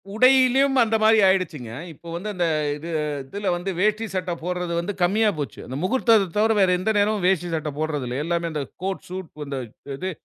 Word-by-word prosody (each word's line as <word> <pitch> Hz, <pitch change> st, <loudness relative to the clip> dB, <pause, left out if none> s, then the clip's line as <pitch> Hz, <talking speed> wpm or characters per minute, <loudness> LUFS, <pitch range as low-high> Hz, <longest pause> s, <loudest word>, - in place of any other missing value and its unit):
உடையிலயும் 265 Hz, +2 st, +5 dB
அந்தமாரி 220 Hz, 0 st, +3 dB
ஆயிடுச்சிங்க. 160 Hz, -11 st, 0 dB, 0.2 s
இப்போ 170 Hz, -, -16 dB
வந்து 200 Hz, +5 st, -4 dB
அந்த 175 Hz, -2 st, 0 dB, 0.3 s
இது 160 Hz, +3 st, -8 dB, 0.4 s
இதில 200 Hz, +5 st, -5 dB
வந்து 185 Hz, +2 st, -3 dB
வேஷ்டி 215 Hz, +2 st, +1 dB
சட்ட 185 Hz, -1 st, -2 dB
போட்றது 180 Hz, -1 st, -2 dB
வந்து 195 Hz, +4 st, -3 dB
கம்மியா 210 Hz, +4 st, +3 dB
போச்சு. 145 Hz, -, -5 dB
அந்த 130 Hz, -, -7 dB
முகூர்த்தத்த 225 Hz, -3 st, +3 dB
தவர, 220 Hz, +1 st, +3 dB
வேற 190 Hz, -2 st, +4 dB
எந்த 220 Hz, +4 st, 0 dB
நேரமும் 205 Hz, -1 st, +1 dB
வேஷ்டி 175 Hz, -2 st, +1 dB
சட்ட 150 Hz, -1 st, -3 dB
போட்றதில்ல. 145 Hz, -5 st, -2 dB
எல்லாமே 170 Hz, 0 st, -1 dB
அந்த 150 Hz, -2 st, -2 dB, 0.2 s
கோட் 190 Hz, 0 st, -3 dB
ஷூட் 185 Hz, -2 st, -6 dB, 0.2 s
இந்த 140 Hz, -1 st, -4 dB, 0.4 s
இது 185 Hz, +3 st, -3 dB
185 Hz, 175 wpm, -23 LUFS, 170-215 Hz, 0.4 s, உடையிலயும்